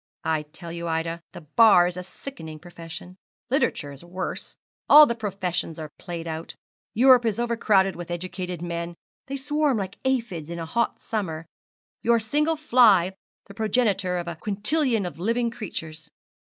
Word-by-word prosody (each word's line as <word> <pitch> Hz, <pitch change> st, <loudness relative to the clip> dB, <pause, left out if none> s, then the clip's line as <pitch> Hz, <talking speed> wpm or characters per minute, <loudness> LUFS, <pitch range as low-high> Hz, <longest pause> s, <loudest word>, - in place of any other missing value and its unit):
I 155 Hz, -1 st, 0 dB
tell 170 Hz, +1 st, -8 dB
you, 170 Hz, 0 st, -5 dB
Ida, 165 Hz, +1 st, -2 dB
the 175 Hz, -, -10 dB
Bar 180 Hz, +3 st, +6 dB
is 175 Hz, 0 st, -2 dB
a 180 Hz, -, -4 dB
sickening 180 Hz, -, -9 dB
profession; 175 Hz, +2 st, -10 dB, 0.3 s
literature 165 Hz, -, 0 dB
is 140 Hz, +2 st, -10 dB
worse; 180 Hz, +2 st, -5 dB, 0.3 s
all 300 Hz, +1 st, +11 dB
the 235 Hz, -, 0 dB
professions 190 Hz, -7 st, -3 dB
are 155 Hz, -2 st, -7 dB
played 170 Hz, -2 st, -6 dB
out, 160 Hz, 0 st, -5 dB, 0.4 s
Europe 250 Hz, +1 st, +7 dB
is 225 Hz, -3 st, 0 dB
overcrowded 220 Hz, -5 st, +2 dB
with 175 Hz, 0 st, -8 dB
educated 180 Hz, 0 st, -4 dB
men; 170 Hz, 0 st, -4 dB, 0.3 s
they 275 Hz, -, -4 dB
swarm 290 Hz, -1 st, +1 dB
like 195 Hz, -1 st, -5 dB
aphides 230 Hz, -, -1 dB
in 170 Hz, -, -5 dB
a 165 Hz, -, -4 dB
hot 235 Hz, +8 st, -1 dB
summer 165 Hz, -8 st, -3 dB, 0.6 s
your 235 Hz, 0 st, +4 dB
single 300 Hz, +9 st, +1 dB
fly 225 Hz, -, +5 dB, 0.3 s
the 200 Hz, -, -12 dB
progenitor 205 Hz, -4 st, +1 dB
of 175 Hz, 0 st, -4 dB
a 170 Hz, -1 st, -5 dB
quintillion 215 Hz, -, +1 dB
of 175 Hz, -2 st, -6 dB
living 230 Hz, +5 st, 0 dB
creatures. 160 Hz, -8 st, -6 dB
185 Hz, 160 wpm, -25 LUFS, 170-235 Hz, 0.6 s, all